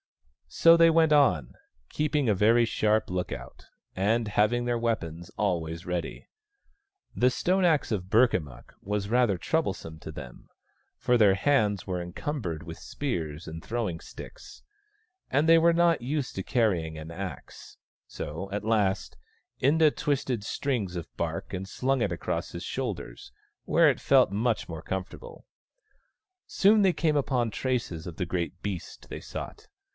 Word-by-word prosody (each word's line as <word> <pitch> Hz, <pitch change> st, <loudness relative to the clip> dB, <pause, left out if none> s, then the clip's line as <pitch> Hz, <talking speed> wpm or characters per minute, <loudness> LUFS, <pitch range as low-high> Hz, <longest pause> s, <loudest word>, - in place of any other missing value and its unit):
So 165 Hz, 0 st, +6 dB
they 165 Hz, 0 st, +6 dB
went 160 Hz, -1 st, +4 dB
on, 90 Hz, -, +3 dB, 0.4 s
keeping 150 Hz, -3 st, 0 dB
a 110 Hz, -, +4 dB
very 115 Hz, +4 st, +4 dB
sharp 110 Hz, -1 st, +1 dB
look 90 Hz, 0 st, -2 dB
out, 65 Hz, -3 st, -9 dB, 0.3 s
and 110 Hz, +4 st, +1 dB
having 110 Hz, +4 st, +1 dB
their 120 Hz, -1 st, 0 dB
weapons 85 Hz, -8 st, -3 dB
always 85 Hz, -5 st, -1 dB
ready. 90 Hz, -2 st, -4 dB, 0.9 s
The 125 Hz, -, +4 dB
stone 185 Hz, +9 st, +1 dB
axe 155 Hz, -7 st, +2 dB
of 95 Hz, -4 st, -2 dB
Burkamukk 90 Hz, -, +1 dB
was 105 Hz, 0 st, -2 dB
rather 120 Hz, -3 st, +2 dB
troublesome 85 Hz, -, -2 dB
to 80 Hz, -, -8 dB
them, 65 Hz, -5 st, -11 dB, 0.5 s
for 125 Hz, -, +2 dB
their 100 Hz, -4 st, +5 dB
hands 105 Hz, -, +1 dB
were 90 Hz, -1 st, -2 dB
encumbered 85 Hz, -, -4 dB
with 80 Hz, -1 st, -9 dB
spears 85 Hz, -, -4 dB
and 80 Hz, +1 st, -7 dB
throwing 110 Hz, -8 st, -3 dB
sticks, -, -, -12 dB, 0.7 s
and 145 Hz, +4 st, +2 dB
they 165 Hz, 0 st, +7 dB
were 170 Hz, +1 st, +5 dB
not 170 Hz, -2 st, +3 dB
used 140 Hz, +2 st, -3 dB
to 95 Hz, -, -3 dB
carrying 90 Hz, -, 0 dB
an 80 Hz, +1 st, -8 dB
axe: 90 Hz, -1 st, -8 dB, 0.3 s
so, 85 Hz, +7 st, -6 dB
at 105 Hz, +1 st, -3 dB
last, 105 Hz, -4 st, 0 dB, 0.5 s
Inda 155 Hz, +3 st, +4 dB
twisted 135 Hz, -6 st, -1 dB
strings 110 Hz, -5 st, -2 dB
of 85 Hz, -3 st, -5 dB
bark -, -, -4 dB
and 95 Hz, +1 st, -5 dB
slung 130 Hz, +5 st, 0 dB
it -, -, 0 dB
across 85 Hz, -4 st, -3 dB
his -, -, -7 dB
shoulders, -, -, -5 dB, 0.3 s
where -, -, +4 dB
it -, -, -1 dB
felt -, -, +4 dB
much 110 Hz, +3 st, 0 dB
more 80 Hz, -2 st, -6 dB
comfortable. 95 Hz, +2 st, -6 dB, 1.0 s
Soon 210 Hz, +2 st, +4 dB
they 190 Hz, -2 st, +5 dB
came 155 Hz, -3 st, +1 dB
upon 125 Hz, -5 st, 0 dB
traces 115 Hz, -10 st, -2 dB
of 85 Hz, -, -8 dB
the 90 Hz, -, -1 dB
great 85 Hz, +1 st, -3 dB
beast 95 Hz, -5 st, -6 dB
they -, -, -7 dB
sought. 425 Hz, +1 st, -8 dB
105 Hz, 150 wpm, -27 LUFS, 85-135 Hz, 1.0 s, they